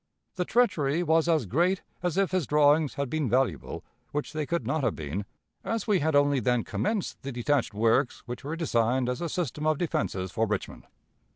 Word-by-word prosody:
The 180 - -2
treachery 170 - +2
was 165 0 +3
as 160 -7 +2
great 175 - +1 0.2
as 180 0 -1
if 195 -1 +2
his 185 -6 0
drawings 150 0 +4
had 140 0 -1
been 150 -1 -1
valuable, 125 - 0 0.3
which 145 0 -3
they 155 -2 -2
could 170 0 -1
not 155 -2 -1
have 115 - +1
been, 80 +7 -4 0.4
as 225 0 -2
we 205 -4 +3
had 155 -1 +1
only 145 -1 +4
then 125 0 +1
commenced 210 -2 -2
the 140 - -5
detached 125 -2 0
works 115 +4 +2
which 120 +3 -6
were 150 +4 -3
designed 125 -5 +1
as 125 +4 -2
a 170 - -2
system 155 -2 -2
of 155 -1 +2
defenses 95 - -2
for 110 +3 0
Richmond. 105 -2 -4
145 Hz, 195 wpm, -28 LUFS, 120-165 Hz, 0.4 s, drawings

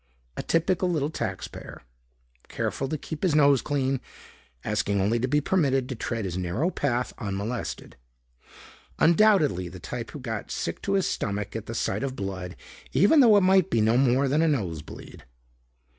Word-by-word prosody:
A - - -3
typical 180 +2 +1
little 155 -3 0
taxpayer, 95 - -6 0.6
careful 135 - -3
to 155 - -2
keep 150 +1 -7
his 180 -6 +2
nose 140 -4 +5
clean, 135 -1 -1 0.6
asking 105 -1 0
only 105 +5 +1
to 125 - 0
be 150 +3 +2
permitted 135 -7 +1
to - - -2
tread 115 -2 -3
his 90 -1 -3
narrow 105 - -1
path 125 -6 -1
unmolested. 105 +2 -4 1.0
Undoubtedly 160 - +4
the 90 +1 -10
type 120 +6 -6
who 150 - -8
got 115 -5 -5
sick 85 - -4
to 195 - -1
his 195 -2 +2
stomach 100 0 -3
at 115 -1 -5
the 115 - -5
sight - - -1
of 135 -1 -3
blood 95 -4 -5 0.4
even 250 - +5
though 230 -6 +7
it - - +5
might 190 -1 +4
be 115 - +1
no 110 +2 +3
more 130 +1 +3
than 145 +4 +2
a 165 - +3
nose 95 - -1
bleed. - - -12
130 Hz, 175 wpm, -26 LUFS, 105-160 Hz, 1.0 s, though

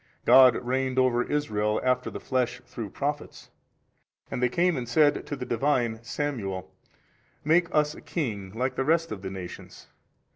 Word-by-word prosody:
God 125 -1 +8
reigned 130 +1 -1
over 130 -2 +3
Israel 105 -7 0
after 125 0 +1
the - - -7
flesh 125 -2 -1
through 120 -4 -7
Prophets. 145 +7 -5 0.8
And 125 - -3
they 125 - +3
came 175 +5 +2
and 125 -3 -4
said 145 +3 +3
to 145 - -3
the 125 - -6
Divine 120 -3 0
Samuel, 105 -8 -4 0.7
Make 170 +3 +3
us 150 -1 +2
a - - -12
king 105 - -4
like 130 +3 -1
the - - -1
rest 165 +3 +1
of 100 - -5
the 95 - -5
nations. 95 -2 -9
125 Hz, 160 wpm, -27 LUFS, 115-145 Hz, 0.8 s, God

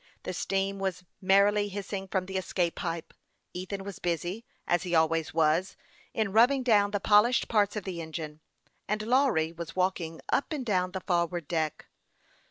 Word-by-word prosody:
The - - -4
steam, 195 0 -1
was 190 -2 -2 0.2
merrily 200 +2 +4
hissing 195 0 -5
from 190 -1 -1
the 190 +1 -7
escape 180 -2 0
pipe; 165 -1 -4 0.4
Ethan 190 +2 -5
was 200 -1 -7
busy, 175 +5 -2 0.2
as 175 -1 +2
he 180 -2 -1
always 160 0 +2
was, 165 +3 +1 0.3
in 215 -3 -1
rubbing 250 +5 +5
down 210 -4 +4
the 205 0 -1
polished 215 +5 +4
parts 210 -2 +2
of 210 - -3
the 175 -3 -5
engine, 155 -1 -6 0.5
and 210 +1 -1
Lawry 235 - +2
was 170 -1 -8
walking 180 -3 -1
up 280 - 0
and 275 -4 -3
down 185 -4 0
the 190 - -3
forward 170 -3 -1
deck. 160 -3 -2
190 Hz, 170 wpm, -29 LUFS, 170-205 Hz, 0.5 s, rubbing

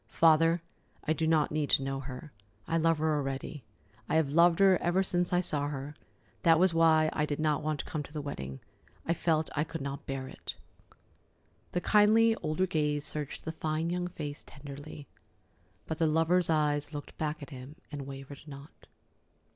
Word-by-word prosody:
"Father, 165 +1 +4 0.4
I 155 - +1
do 160 0 -1
not 155 -2 +3
need 155 -2 -1
to 135 - +4
know 135 0 -2
her. 135 +2 -8 0.4
I 165 - 0
love 165 0 +3
her 155 0 +1
already. 135 0 -4 0.5
I - - +1
have 160 -3 +2
loved 170 +2 +5
her 195 -2 +5
ever 180 +2 +2
since 180 -1 0
I 180 0 +3
saw 150 -5 0
her. 145 0 -5 0.5
That 165 -2 +5
was 180 +1 +4
why 160 -1 +4
I 150 0 0
did 145 0 -3
not 155 -1 +1
want 155 -1 -1
to - - -16
come 155 -4 -3
to 145 - -10
the 155 - -4
wedding. 70 - -6 0.4
I 165 - +2
felt 160 -1 +1
that 145 - -6
I - - +4
could 165 0 -6
not 140 0 -5
bear 135 -1 -3
it." - - -7 1.2
The 180 - 0
kindly 220 +3 +5
older 155 +5 0
gaze 150 -4 0
searched 150 -2 -5
the 160 - -2
fine 160 +1 -2
young 180 0 -1
face 150 -4 -6
tenderly, 145 +1 -10 0.8
but 160 - -4
the 165 - +3
lover's 165 +3 +2
eyes 150 -1 +1
looked 145 - -7
back 150 -1 -2
at 140 - -10
him 130 +2 -9 0.2
and 140 -2 -6
wavered 135 0 -9
not. 140 0 -12
155 Hz, 190 wpm, -30 LUFS, 145-165 Hz, 1.2 s, loved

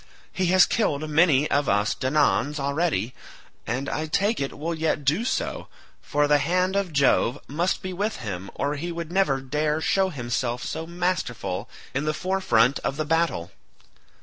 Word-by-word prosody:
He 185 -1 0
has 185 +1 +6
killed 155 -9 0
many 155 -2 +4
of 145 -1 +2
us 100 +1 +2
Danaans 145 +2 +1
already, 140 - 0 0.5
and 130 +4 -2
I 155 +1 -2
take 200 +8 +1
it 135 - -3
will 165 +3 -2
yet 160 -2 -1
do 155 +11 +2
so, 245 - -2 0.3
for 145 0 +1
the 145 0 +4
hand 180 +5 +1
of 200 -3 0
Jove 140 -3 +3
must 170 +6 -1
be 185 0 -4
with 205 +4 -1
him 100 -6 -6
or 145 +1 -1
he 170 +4 -4
would 170 -1 -5
never 180 -8 +2
dare 150 +3 -1
show 190 +4 +2
himself 120 -4 -2
so 160 +1 -4
masterful 170 - -2 0.2
in 140 +3 -1
the 155 0 0
forefront 140 -10 +2
of 135 - -3
the 155 - -1
battle. 165 - 0
150 Hz, 170 wpm, -25 LUFS, 135-175 Hz, 0.5 s, has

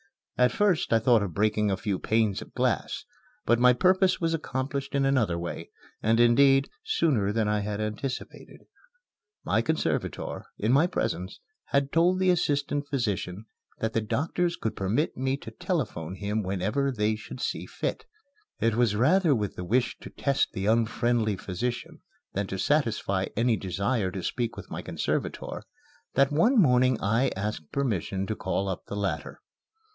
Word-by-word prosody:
At 125 -1 +4
first 200 +2 +1
I 115 - +6
thought 115 0 +4
of 95 -5 -4
breaking 105 0 +2
a 95 - 0
few 100 -1 -2
panes 110 -3 +1
of - - -12
glass; - - -1 0.4
but 120 +1 +3
my 125 0 +6
purpose 185 +5 +3
was 165 -1 0
accomplished 140 -2 -3
in 135 -1 +2
another 120 -11 +2
way 85 0 -5 0.3
and, 115 +2 +2
indeed, 135 +3 +5 0.2
sooner 120 -12 +1
than 110 0 0
I 105 0 +1
had 105 0 -3
anticipated. 110 +5 -5 0.8
My - - +2
conservator, - - -2
in 110 - +1
my 145 +6 +5
presence, 95 - -3 0.3
had 140 0 0
told 175 +3 +3
the 185 -1 +3
assistant 145 -3 0
physician 105 -7 -2 0.3
that 110 0 -2
the 115 - +1
doctors 170 +9 -1
could 110 - -3
permit 110 - 0
me 130 +1 -1
to - - -10
telephone 115 - -3
him 105 +2 -2
whenever 105 +9 -1
they 110 -3 0
should 110 +4 -9
see - - -3
fit. - - -4 0.5
It 115 - +2
was 115 -2 +2
rather 150 - +4
with 105 -4 -2
the 90 - -5
wish 120 +7 0
to - - -9
test 140 -1 0
the 95 - -3
unfriendly 115 0 +2
physician 115 +7 -4 0.3
than 100 0 -1
to 95 - -4
satisfy 110 -6 +1
any 115 0 +3
desire 100 +2 -1
to 95 -1 -6
speak 120 +3 -2
with - - -9
my - - -4
conservator - - -3 0.5
that 140 +1 +4
one 220 - +4
morning 125 - +4
I 115 +7 +2
asked 100 -6 -4
permission 100 - -1
to 110 - -3
call 100 -1 -2
up 95 -2 -4
the - - -5
latter. 100 -1 -3
115 Hz, 165 wpm, -27 LUFS, 105-140 Hz, 0.8 s, I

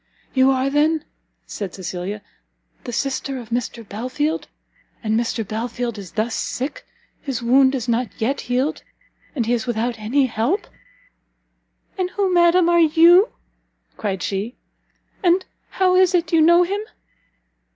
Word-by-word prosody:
"You 260 0 +4
are 265 +1 +1
then," 305 +2 +2 0.4
said 200 -3 -6
Cecilia, 190 +2 -5 0.6
"the - - -4
sister 270 +2 -2
of 235 -3 -9
Mr 235 -2 -3
Belfield? 255 +9 -2 0.6
And 215 -1 0
Mr 225 -1 -1
Belfield 235 +1 -3
is 190 -4 -10
thus 225 +1 -1
sick, 265 +5 -4 0.3
his 255 -4 -4
wound 260 +3 +4
is 250 -2 -3
not 235 0 0
yet 270 +5 0
healed, 255 +5 -1 0.5
and 240 -5 0
he 235 - +1
is 240 0 -1
without 235 0 -1
any 255 +6 +2
help!" 245 - -1 1.3
"And 365 -1 0
who, 385 -1 0
madam, 345 0 +5
are 345 0 +4
you?" 335 +5 +6 0.7
cried 195 -4 -3
she, 205 +5 -3 0.7
"and 370 0 +3 0.2
how 370 -1 +2
is 370 0 +4
it 335 -1 0
you 325 - +5
know 345 +2 +6
him?" 400 +4 -2
260 Hz, 140 wpm, -21 LUFS, 225-330 Hz, 1.3 s, you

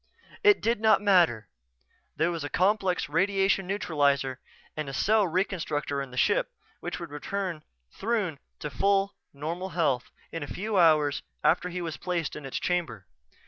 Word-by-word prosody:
It 415 -1 +6
did 230 -1 +1
not 220 -1 +5
matter 170 - +4 0.7
there 160 +3 +1
was 165 -3 -4
a 145 - -4
complex 190 +1 +1
radiation 195 +3 +2
neutralizer 140 -8 +1 0.4
and 140 -3 -4
cell 215 +3 +3
reconstructor 160 -6 -1
in 135 - -6
the 125 - -10
ship - - +2 0.3
which - - -5
would - - -7
return 175 +2 -3 0.3
Throon 200 -9 -1 0.2
to 150 - -4
full, 195 +8 +2 0.2
normal 165 +6 -4
health 135 -7 +1 0.2
a 160 -3 -4
few 205 +1 -1
hours 155 -4 +4 0.2
after 180 +1 +3
he 180 0 -4
was 165 -2 -4
placed 175 -3 -2
in 150 -2 -7
its 135 - -3
chamber. 150 - -2
170 Hz, 150 wpm, -28 LUFS, 145-195 Hz, 0.7 s, It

